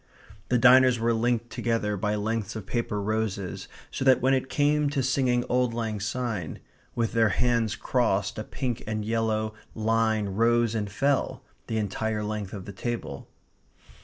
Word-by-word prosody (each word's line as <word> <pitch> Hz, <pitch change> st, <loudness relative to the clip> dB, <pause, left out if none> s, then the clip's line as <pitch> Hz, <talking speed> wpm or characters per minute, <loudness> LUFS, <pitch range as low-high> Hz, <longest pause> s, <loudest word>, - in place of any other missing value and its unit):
The 125 Hz, -, +3 dB
diners 130 Hz, 0 st, +6 dB
were 115 Hz, +1 st, +1 dB
linked 120 Hz, 0 st, 0 dB
together 115 Hz, -3 st, -1 dB
by 105 Hz, +2 st, -1 dB
lengths 110 Hz, 0 st, -2 dB
of 110 Hz, -4 st, -6 dB
paper 105 Hz, 0 st, -2 dB
roses, 100 Hz, -3 st, -2 dB, 0.2 s
so -, -, -3 dB
that 130 Hz, -1 st, +5 dB
when 130 Hz, +2 st, +3 dB
it 130 Hz, 0 st, 0 dB
came 150 Hz, 0 st, +2 dB
to 140 Hz, -2 st, -1 dB
singing 125 Hz, -1 st, +1 dB
"Auld 125 Hz, -1 st, 0 dB
Lang 110 Hz, -3 st, -2 dB
Syne" 110 Hz, -5 st, -3 dB, 0.4 s
with 115 Hz, -2 st, 0 dB
their 115 Hz, -2 st, +4 dB
hands 115 Hz, +1 st, +1 dB
crossed 105 Hz, -5 st, 0 dB
a -, -, -3 dB
pink 125 Hz, 0 st, -4 dB
and 110 Hz, -1 st, -2 dB
yellow 110 Hz, -1 st, 0 dB, 0.2 s
line 110 Hz, -1 st, +1 dB
rose 115 Hz, +3 st, +2 dB
and 105 Hz, -2 st, -2 dB
fell 140 Hz, +6 st, 0 dB, 0.2 s
the 110 Hz, -, -2 dB
entire 105 Hz, +1 st, -2 dB
length 105 Hz, -2 st, -4 dB
of 95 Hz, -3 st, -7 dB
the 100 Hz, -, -8 dB
table. 120 Hz, +4 st, -5 dB
115 Hz, 160 wpm, -27 LUFS, 105-125 Hz, 0.4 s, diners